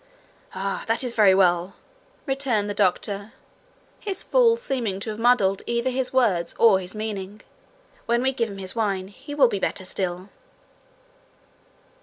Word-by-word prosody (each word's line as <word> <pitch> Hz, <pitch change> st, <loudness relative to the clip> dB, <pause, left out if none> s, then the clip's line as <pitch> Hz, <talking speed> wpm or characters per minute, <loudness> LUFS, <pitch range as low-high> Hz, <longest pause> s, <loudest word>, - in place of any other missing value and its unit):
'Ah, 195 Hz, +1 st, -3 dB
that 225 Hz, +3 st, +1 dB
is 245 Hz, -2 st, -3 dB
very 205 Hz, -4 st, +5 dB
well!' 180 Hz, 0 st, +2 dB, 0.5 s
returned 270 Hz, -7 st, 0 dB
the 205 Hz, -, -2 dB
doctor, 200 Hz, +2 st, -1 dB, 0.7 s
his 390 Hz, -3 st, -2 dB
fall 480 Hz, -2 st, +4 dB
seeming 250 Hz, -, -3 dB
to 215 Hz, +2 st, -4 dB
have 210 Hz, -, -7 dB
muddled 225 Hz, -5 st, +3 dB
either 235 Hz, +2 st, 0 dB
his 255 Hz, 0 st, -2 dB
words 195 Hz, -10 st, +1 dB
or 215 Hz, -5 st, +5 dB
his 185 Hz, +2 st, -8 dB
meaning. 210 Hz, -1 st, -5 dB, 0.7 s
'When 235 Hz, +1 st, +1 dB
we 265 Hz, -, +2 dB
give 230 Hz, -3 st, -1 dB
him 200 Hz, -, -8 dB
his 190 Hz, +1 st, -5 dB
wine, 195 Hz, -4 st, -1 dB
he 270 Hz, +8 st, -10 dB
will 275 Hz, -3 st, +6 dB
be 205 Hz, -4 st, -2 dB
better 190 Hz, -, -2 dB
still.' 185 Hz, 0 st, -3 dB
215 Hz, 155 wpm, -24 LUFS, 195-250 Hz, 0.7 s, will